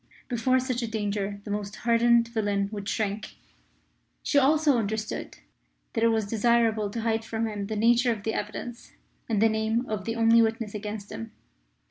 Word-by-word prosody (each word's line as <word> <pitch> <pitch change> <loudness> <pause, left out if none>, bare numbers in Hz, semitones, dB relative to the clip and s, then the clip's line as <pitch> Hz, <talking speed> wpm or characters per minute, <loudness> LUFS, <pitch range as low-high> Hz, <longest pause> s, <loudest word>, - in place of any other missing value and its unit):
Before 255 +1 +2
such 255 -1 -2
a 235 - -2
danger 205 -2 -2
the 205 - -6
most 205 0 -3
hardened 235 0 +3
villain 205 -3 0
would 205 -2 -5
shrink. 215 0 -2 0.9
She 285 - +3
also 290 -1 +4
understood 215 0 -3 0.6
that 225 - 0
it - - +6
was 220 -2 +1
desirable 225 0 +2
to 230 +3 -4
hide 225 0 0
from 225 0 -2
him 205 -2 -4
the 220 - -3
nature 240 +3 +4
of 215 -3 -4
the 220 - -1
evidence 235 +3 -6 0.4
and 220 -3 +1
the 225 - +5
name 220 +2 0
of 210 -3 -3
the 230 - -2
only 230 0 +5
witness 225 -1 -1
against 210 -1 -6
him. 115 0 -7
220 Hz, 175 wpm, -27 LUFS, 210-235 Hz, 0.9 s, it